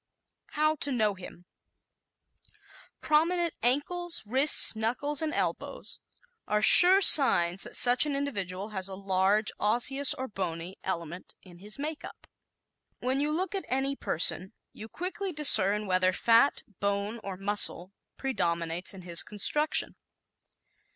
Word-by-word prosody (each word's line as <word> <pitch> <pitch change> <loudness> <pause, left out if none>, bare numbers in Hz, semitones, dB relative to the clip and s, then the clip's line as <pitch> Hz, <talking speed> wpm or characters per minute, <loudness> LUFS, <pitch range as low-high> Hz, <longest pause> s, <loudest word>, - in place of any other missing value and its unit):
How 310 +1 -1
to 285 - -4
Know 215 -5 -1
Him 180 -1 -14 1.0
¶ - - -22 0.5
Prominent 335 +3 -1
ankles, 335 +8 -1
wrists, 265 +3 +4
knuckles 255 +7 -2
and 315 -1 -3
elbows - - -4 0.5
are 210 0 -2
sure 370 - +9
signs 185 - +4
that - - -6
such 245 +4 +5
an 285 - -4
individual 200 -8 -5
has 190 -3 -4
a 190 - -4
large 195 +2 -1
osseous 255 +6 +1
or 260 - -7
bony 180 -3 -6
element 175 -1 -7
in 175 -2 -17
his 210 +3 -6
makeup. 300 +2 -9 0.7
When 260 +2 -3
you 295 - -2
look 365 +6 -4
at 390 - -4
any 270 +2 -3
person 185 - -1 0.2
you 220 +1 -12
quickly 375 - -6
discern 210 - +4
whether 185 -1 0
fat, 230 +8 +1 0.2
bone 200 +3 -3
or 195 -2 -7
muscle 195 -2 -1 0.3
predominates 175 -7 -4
in 185 - -13
his 170 -1 -2
construction. 295 +9 0
220 Hz, 130 wpm, -26 LUFS, 190-285 Hz, 1.0 s, sure